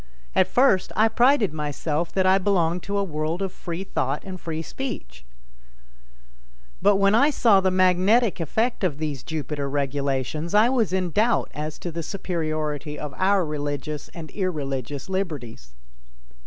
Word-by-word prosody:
At 185 - +4
first 225 -2 +3
I 215 +2 +5
prided 240 - +3
myself 150 +2 -2
that 190 -1 +2
I 190 +1 +5
belonged 180 -3 +1
to 200 +3 -3
a 200 - +1
world 160 +1 -2
of 190 - -2
free 175 +1 -5
thought 140 -6 -2
and 185 -2 -7
free 160 -1 -4
speech, 160 - -6 1.6
but 205 0 +5
when 195 +1 +3
I 275 +7 +5
saw 225 -8 +4
the 190 - +2
magnetic 185 +5 +3
effect 220 - -1
of 160 -7 0
these 150 -4 -3
Jupiter 150 -3 -4
regulations 140 +4 -1
I 215 +3 +6
was 240 -6 +1
in 185 -2 0
doubt 225 +7 +2
as 150 +1 -5
to 175 - -5
the 170 +1 -4
superiority 155 -5 -3
of 150 -2 -6
our 190 -1 +2
religious 145 -1 -4
and 160 -3 -9
irreligious 145 - -3
liberties. 140 - -4
170 Hz, 155 wpm, -24 LUFS, 150-195 Hz, 1.6 s, I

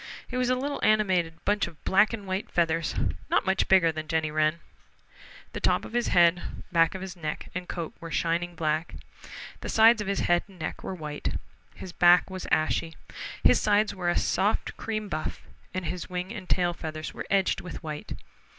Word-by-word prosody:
He 250 - -6
was 250 0 +1
a 255 - +3
little 280 +3 -3
animated 185 -6 +2
bunch 205 -1 +2
of 165 -3 -14
black 205 +3 +4
and 215 -3 -5
white 190 +1 -3
feathers, 165 -1 0 0.3
not - - +2
much 190 0 +1
bigger 185 -4 +5
than 155 0 -6
Jenny 155 0 0
Wren. 155 +2 +1 0.9
The - - -4
top - - +1
of - - -10
his 240 0 +1
head, 175 0 +5 0.3
back 165 0 +3
of 190 - -5
his 190 -1 -7
neck 155 -3 -5
and 180 0 -5
coat 170 -2 -4
were 165 - -7
shining 170 +1 -1
black. 160 0 -1 0.6
The - - -6
sides 225 0 +6
of 210 - -4
his 200 0 0
head 175 0 +3
and 195 -2 -17
neck 160 - -5
were 190 - -4
white. 150 -3 -4 0.4
His 185 - -8
back 175 +2 +5
was 185 -1 -6
ashy. 160 +1 +1 0.5
His - - +5
sides 210 0 +3
were 180 -2 -1
a 175 - +1
soft 205 +3 0
cream 215 -2 -3
buff, 155 -4 -4 0.3
and 185 -1 -4
his 180 +2 -4
wing 180 +3 -4
and 200 -5 -8
tail 175 -1 +2
feathers 155 -2 -6
were - - -7
edged 195 -1 +2
with 180 - -8
white. 150 -2 -5
180 Hz, 195 wpm, -27 LUFS, 165-195 Hz, 0.9 s, sides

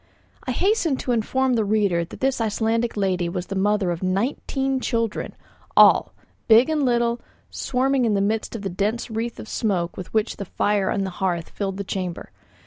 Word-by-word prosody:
I - - 0
hasten 360 - +1
to 255 - -3
inform 255 +3 +1
the 225 -2 +2
reader 200 -5 +1
that 170 - -11
this 265 -2 +1
Icelandic 225 +1 0
lady 185 -3 0
was 180 0 -4
the 195 - -5
mother 200 -1 +1
of 170 - -4
nineteen 260 +7 -1
children, 230 -4 -2 0.4
all, - - +6 0.4
big 235 +6 +6
and 305 -2 +1
little, 235 -1 +1 0.3
swarming 265 0 +1
in 215 -3 +2
the - - +2
midst 215 +3 -1
of 215 - -6
the 195 - -2
dense 210 +6 -2
wreaths 225 +1 -3
of - - -8
smoke 185 -7 -1
with 185 - -7
which 220 0 0
the 200 - -5
fire 205 +1 0
on 195 - 0
the 190 - -3
hearth 175 -3 -1
filled 195 -2 -3
the 200 - -3
chamber. 185 -3 -5
215 Hz, 190 wpm, -23 LUFS, 195-240 Hz, 0.4 s, all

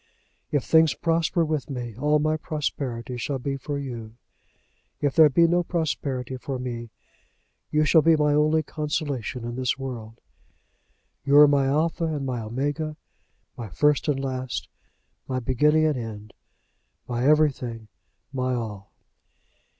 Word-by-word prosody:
If 145 -4 +1
things 160 -5 +4
prosper 165 +3 +1
with 155 -2 -2
me, 120 -5 -5
all 150 +5 +2
my 155 +1 +1
prosperity 135 -6 -4
shall 135 +3 -2
be 135 +2 -3
for 140 +2 -4
you. 120 -5 -6 0.8
If 145 -2 0
there 160 -2 +8
be 170 +5 +4
no 175 +1 +3
prosperity 140 -7 -2
for 130 +1 -4
me, 120 -2 -5 0.8
you 155 0 +2
shall 160 +1 +5
be 165 +1 +5
my 150 -1 +2
only 155 +1 +3
consolation 145 -6 -3
in 120 0 -4
this 130 -1 0
world. 120 -4 -7 1.0
You 140 +1 +4
are 150 0 +10
my 140 -1 +3
Alpha 160 +4 +1
and 150 -4 -2
my 125 -2 -2
Omega, 145 +7 -3 0.6
my 115 -3 -7
first 150 - +2
and 145 -3 +1
last, 130 -1 -3 0.6
my 130 -1 -1
beginning 150 +5 +3
and 150 -3 +1
end, 105 -2 -8 0.7
my 120 0 -2
everything, 130 -7 +2 0.5
my 130 -1 0
all." 105 -5 -6
140 Hz, 140 wpm, -25 LUFS, 125-155 Hz, 1.0 s, are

